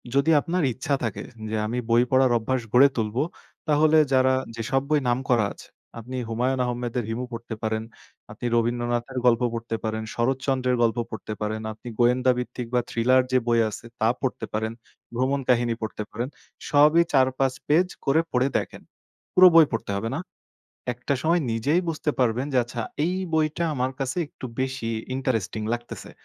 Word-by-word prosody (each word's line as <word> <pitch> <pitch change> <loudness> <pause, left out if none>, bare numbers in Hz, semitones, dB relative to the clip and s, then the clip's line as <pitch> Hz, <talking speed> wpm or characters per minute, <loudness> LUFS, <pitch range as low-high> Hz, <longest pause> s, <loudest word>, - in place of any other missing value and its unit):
যদি 140 +4 +4
আপনার 180 +2 -1
ইচ্ছা 130 +4 -1
থাকে 115 -4 -3 0.3
যে, 110 - -2
আমি 120 +3 -3
বই 120 +1 +5
পড়ার 130 -1 +4
অভ্যাস 125 +3 -1
গড়ে 130 +3 +8
তুলবো 115 +4 0 0.4
তাহলে 155 +1 +4 0.2
যারা 130 0 +4 0.2
যেসব 115 +4 0
বই 150 - +4
নাম 120 - +2
করা 120 -4 +4
আছে - - -14 0.3
আপনি 125 +3 -6
হুমায়ূন 125 +3 0
আহমেদের 120 0 -2
'হিমু' 120 +3 -3
পড়তে 115 0 -6
পারেন, 110 0 -1 0.5
আপনি 115 +3 -8
রবীন্দ্রনাথের 120 +2 -1
গল্প 120 -1 +4
পড়তে 115 0 -3
পারেন, 110 0 -2
শরৎচন্দ্রের 130 0 0
গল্প 115 0 +1
পড়তে 110 -1 -6
পারেন, 110 +1 -2
আপনি 110 +3 -14
গোয়েন্দা 125 +1 +4
ভিত্তিক 125 0 -4
বা 125 - +3
থ্রিলার 130 +3 +3
যে, 130 - +4
বই 115 -1 +3
আছে 110 - -9
তা 110 - +3
পড়তে 130 -4 -2
পারেন। 110 +1 -1 0.4
ভ্রমণ 130 +3 +1
কাহিনী 120 -1 +3
পড়তে 110 -1 -4
পারেন। 120 +4 -3 0.4
সবই 150 +3 +6
৪-৫ 130 0 +3
পেজ 165 +5 +4 0.2
করে 145 +4 +4
পড়ে 125 +1 +2
দেখেন। - - -5 0.5
পুরো 185 0 +9
বই 165 -1 +9
পড়তে 115 -3 -3
হবে 110 +3 -3
না? - - -2 0.8
একটা 125 +4 -2
সময় 170 +2 +3
নিজেই 140 +10 +1
বুঝতে 155 -1 -1
পারবেন 125 +1 +1
যে, 130 - +3
আচ্ছা 120 0 -6 0.2
এই 180 +3 0 0.2
বইটা 155 +1 +1
আমার 130 -1 -1
কাছে 135 +2 -2
একটু 140 - -9
বেশি 130 -3 -2 0.2
ইন্টারেস্টিং 115 -5 -1
লাগতেছে। 120 0 -6
125 Hz, 170 wpm, -25 LUFS, 115-135 Hz, 0.8 s, পুরো